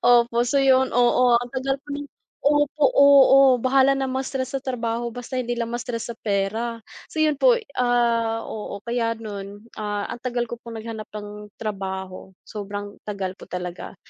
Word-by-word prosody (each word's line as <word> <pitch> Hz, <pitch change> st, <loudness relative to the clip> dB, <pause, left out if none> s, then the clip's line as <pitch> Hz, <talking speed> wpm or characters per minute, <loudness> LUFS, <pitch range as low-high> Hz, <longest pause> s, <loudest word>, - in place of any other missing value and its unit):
Opo, 240 Hz, 0 st, +4 dB
so 245 Hz, +3 st, 0 dB
yun, 265 Hz, -1 st, +4 dB
oo, 245 Hz, +1 st, +4 dB, 0.2 s
ang 245 Hz, 0 st, -7 dB
tagal 270 Hz, +1 st, -1 dB
ko 295 Hz, -, -23 dB
ng -, -, -6 dB, 0.4 s
opo, 290 Hz, 0 st, +2 dB
oo 275 Hz, -2 st, +7 dB
bahala 265 Hz, +2 st, +4 dB
na 270 Hz, 0 st, -1 dB
ma-stress 265 Hz, 0 st, -3 dB
sa 270 Hz, -, -2 dB
trabaho 235 Hz, -2 st, -2 dB
basta 245 Hz, +2 st, -8 dB
hindi 240 Hz, -1 st, -2 dB
lang 235 Hz, -1 st, -2 dB
ma-stress 240 Hz, -1 st, -4 dB
sa -, -, -34 dB
pera, 215 Hz, +3 st, -1 dB, 0.3 s
so -, -, -15 dB
yun 305 Hz, -1 st, +3 dB
po, -, -, +5 dB, 0.2 s
ah, 235 Hz, -2 st, +2 dB
oo 210 Hz, -2 st, -6 dB
kaya 230 Hz, -1 st, -1 dB
no'n, 205 Hz, 0 st, -8 dB
ah, 205 Hz, -1 st, -2 dB
ang 240 Hz, -, -6 dB
tagal 245 Hz, -1 st, -1 dB
ko 240 Hz, -, -5 dB
pong 230 Hz, -2 st, -8 dB
naghanap 220 Hz, -1 st, -7 dB
ng 210 Hz, 0 st, -8 dB
trabaho, 190 Hz, -3 st, -5 dB, 0.2 s
sobrang 205 Hz, -1 st, -6 dB, 0.2 s
tagal 195 Hz, -3 st, -3 dB
po -, -, -12 dB
talaga. 180 Hz, +1 st, -6 dB
235 Hz, 170 wpm, -23 LUFS, 210-260 Hz, 0.4 s, oo